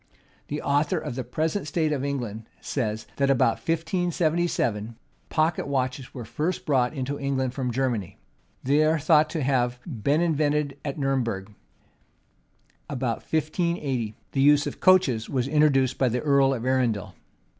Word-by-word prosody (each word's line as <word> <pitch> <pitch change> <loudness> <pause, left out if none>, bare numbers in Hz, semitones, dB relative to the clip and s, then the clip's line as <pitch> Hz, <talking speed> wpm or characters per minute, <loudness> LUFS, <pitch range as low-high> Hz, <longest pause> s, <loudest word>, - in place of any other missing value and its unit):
The 150 +1 -4
author 145 +1 +1
of 150 -4 -4
the 130 +1 -4
Present 155 - -2
State 155 0 0
of 140 -3 -1
England, 120 -6 -4
says, 110 -5 -3
that 140 -1 +2
about 120 -4 +3
1577, 165 - 0 0.3
pocket 160 0 +1
watches 130 -1 -2
were 125 -4 -7
first 160 +10 -2
brought 130 -1 +1
into 140 +1 -3
England 135 -2 -1
from 130 -2 -2
Germany. 120 -7 -2 0.5
They 145 +4 +3
are 155 +1 +3
thought 155 0 +4
to 160 -3 -2
have 125 -2 +1
been 140 - 0
invented 150 -3 +1
at 140 0 -4
Nurem 135 -2 +1
berg. 100 -3 -5 1.4
About 125 -4 -1
1580, 155 - -1 0.2
the 135 - 0
use 145 +1 +5
of - - -5
coaches 160 -12 +4
was 130 -2 0
introduced 140 -4 +3
by 130 - +3
the 125 +2 -1
earl 140 -2 +3
of 120 -1 -5
Arundel. 125 -6 0
140 Hz, 150 wpm, -25 LUFS, 125-155 Hz, 1.4 s, use